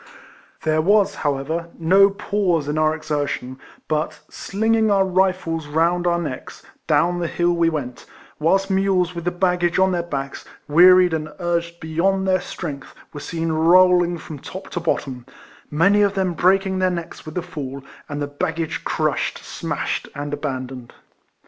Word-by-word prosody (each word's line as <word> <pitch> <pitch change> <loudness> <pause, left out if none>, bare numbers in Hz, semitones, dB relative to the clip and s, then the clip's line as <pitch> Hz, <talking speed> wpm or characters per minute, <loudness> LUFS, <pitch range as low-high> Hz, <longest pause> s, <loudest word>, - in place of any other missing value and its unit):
There 155 0 +2
was, 205 +4 +3
however, 150 +4 -2
no 190 +4 +5
pause 190 -6 -1
in 150 +1 -1
our 155 0 +2
exertion, 145 -4 -3 0.3
but, 155 0 -2
slinging 220 +2 0
our 195 -1 +3
rifles 185 -4 0
round 170 +4 +1
our 170 0 +2
necks, 150 -7 -6 0.2
down 175 +1 +2
the 170 - -1
liill 175 0 +1
we 170 -1 +3
went: 135 -6 -5 0.3
whilst 195 +5 +2
mules 190 -2 +1
with 170 -1 -6
the 175 - +1
ba^jsfanre 180 0 +1
on 190 - +2
their 175 -1 0
ba(*ks, 140 -5 -5 0.2
wearied 180 +3 +6
and 155 -1 -2
urged 170 -1 -2
beyond 190 +5 0
their 185 -1 +2
strength, 145 -6 -7 0.2
were 145 - -6
seen 165 +2 -3
rolling 175 +2 +4
from 155 -2 -9
top 190 +7 -9
to 175 - -2
bottom; 135 -6 -2 0.5
many 195 +7 +3
of 200 -1 +2
them 190 -2 0
breaking 190 +2 +2
their 185 0 +3
necks 170 -2 -6
with 155 - -9
the 180 - -2
fall, 140 -6 -7 0.3
and 145 0 -4
the 145 - -1
baggage 160 +2 -3
crushed, - - -1
smashed, - - -3
and 145 +1 -5
abandoned. 130 -4 -5
170 Hz, 160 wpm, -21 LUFS, 155-185 Hz, 0.5 s, wearied